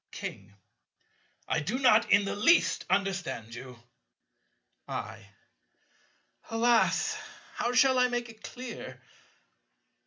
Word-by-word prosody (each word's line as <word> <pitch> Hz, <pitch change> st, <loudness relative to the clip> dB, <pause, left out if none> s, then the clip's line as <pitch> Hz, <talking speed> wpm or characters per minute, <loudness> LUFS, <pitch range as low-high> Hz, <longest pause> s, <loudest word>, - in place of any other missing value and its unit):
King. 100 Hz, +1 st, -8 dB, 0.9 s
I 165 Hz, -, +1 dB
do 185 Hz, +12 st, -2 dB
not 240 Hz, -4 st, +4 dB
in 200 Hz, -, +5 dB
the -, -, -3 dB
least 335 Hz, +12 st, +3 dB
understand 185 Hz, -, -1 dB
you. 125 Hz, +1 st, -9 dB, 1.1 s
I. 100 Hz, -, -6 dB, 1.2 s
Alas! 230 Hz, 0 st, +2 dB, 0.4 s
How 240 Hz, -, -1 dB
shall 260 Hz, 0 st, +4 dB
I 250 Hz, -, +5 dB
make 240 Hz, -1 st, -3 dB
it 225 Hz, -1 st, -15 dB
clear? 250 Hz, -1 st, -8 dB
220 Hz, 100 wpm, -29 LUFS, 165-245 Hz, 1.2 s, in